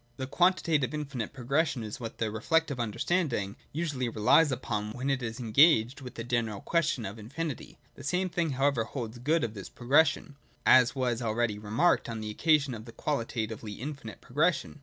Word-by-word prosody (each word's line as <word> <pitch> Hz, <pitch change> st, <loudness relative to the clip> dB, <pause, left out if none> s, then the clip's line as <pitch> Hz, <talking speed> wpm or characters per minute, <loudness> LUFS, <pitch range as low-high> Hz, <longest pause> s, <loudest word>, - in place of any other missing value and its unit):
(2) 130 Hz, -, -4 dB
The -, -, -1 dB
quantitative 165 Hz, -4 st, +2 dB
infinite 140 Hz, -7 st, -4 dB
progression 135 Hz, 0 st, 0 dB
is 105 Hz, -1 st, -6 dB
what 115 Hz, -2 st, -7 dB
the 110 Hz, -2 st, -1 dB
re 110 Hz, -, -5 dB
flective 160 Hz, -1 st, +1 dB
understanding 120 Hz, -, -1 dB, 0.2 s
usually 145 Hz, -6 st, -2 dB
relies 115 Hz, +8 st, +4 dB
upon 105 Hz, -4 st, -3 dB
when 130 Hz, +3 st, -2 dB
it 135 Hz, -1 st, 0 dB
is 115 Hz, +1 st, -4 dB
en 115 Hz, -3 st, -5 dB
gaged 135 Hz, -2 st, +5 dB
with 125 Hz, -1 st, -9 dB
the 115 Hz, -, -5 dB
general 115 Hz, -4 st, -1 dB
question 165 Hz, -, 0 dB
of 100 Hz, +3 st, -6 dB
Infinit}^ 140 Hz, +6 st, -5 dB, 0.2 s
The -, -, -12 dB
same 180 Hz, +6 st, 0 dB
thing 170 Hz, -4 st, -1 dB
however 135 Hz, -2 st, +2 dB
holds 120 Hz, 0 st, -6 dB
good 155 Hz, +6 st, +1 dB
of 115 Hz, -2 st, -2 dB
this 100 Hz, -3 st, -8 dB
progression, 145 Hz, +3 st, +2 dB, 0.3 s
as 125 Hz, 0 st, +6 dB
was 125 Hz, -2 st, 0 dB
already 110 Hz, -2 st, 0 dB
remarked 110 Hz, +9 st, +1 dB
on 115 Hz, -1 st, -4 dB
the 110 Hz, 0 st, -4 dB
occasion 145 Hz, +2 st, +2 dB
of 110 Hz, -1 st, -8 dB
the 115 Hz, -, -10 dB
qualitatively 115 Hz, -6 st, -3 dB
infinite 135 Hz, -2 st, -7 dB
pro 125 Hz, -, -17 dB
gression. 150 Hz, -2 st, +1 dB
125 Hz, 190 wpm, -29 LUFS, 110-150 Hz, 0.3 s, as